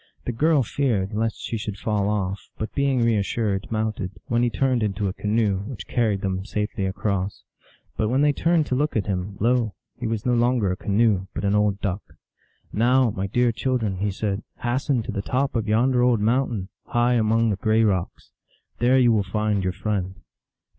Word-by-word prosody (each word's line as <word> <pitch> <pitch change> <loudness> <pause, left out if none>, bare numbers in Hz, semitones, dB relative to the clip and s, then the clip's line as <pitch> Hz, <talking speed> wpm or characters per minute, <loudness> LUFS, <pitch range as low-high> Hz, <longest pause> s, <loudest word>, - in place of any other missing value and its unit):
The - - -1
girl 145 +4 +3
feared 110 -6 -1
lest 110 +1 -1
she 115 - -3
should 105 -2 -5
fall 105 -1 0
off, 100 -2 -2
but 110 - -4
being 140 -3 +1
reas 110 -4 +2
sured 100 -1 -2
mounted, 110 -4 -2 0.2
when 120 0 +1
he 120 - +3
turned 125 +3 +1
into 105 -1 -1
a 95 - -2
canoe, 105 -2 0
which 125 - -7
carried 110 -5 0
them 95 -1 -2
safely 105 -1 -2
across. 100 0 -2 0.5
But 110 - +1
when 130 +4 +2
they 145 0 +4
turned 165 +1 +2
to 130 - -1
look 150 +3 0
at 100 - 0
him, 95 0 -3
lo! 115 -1 +1 0.2
he 120 - -4
was 110 -2 -2
no 125 - +2
longer 120 -4 +2
a - - -1
canoe, 100 -1 +1
but 100 - -2
an 100 - +2
old 105 -1 +1
Duck. 100 0 -1 0.4
" - - -36
Now, 125 +2 +3
my 95 0 -3
dear 120 +4 +2
children," 115 -4 -1
he 100 +3 0
said, 100 0 -2
u - - -15 0.2
hasten 125 0 0
to 115 - -5
the 100 -2 -2
top 130 +6 -1
of 110 -2 -1
yonder 120 +4 +3
old 125 -2 +3
mountain, 115 -3 0 0.2
high 120 +1 +2
among 115 -1 +2
the - - 0
gray 110 +2 +2
rocks. 95 -5 -1 0.5
There 125 +2 +4
you 125 -2 +5
will 110 -2 +3
find 105 -2 0
your 95 -1 -1
friend." 95 -1 -2
110 Hz, 200 wpm, -24 LUFS, 100-120 Hz, 0.5 s, you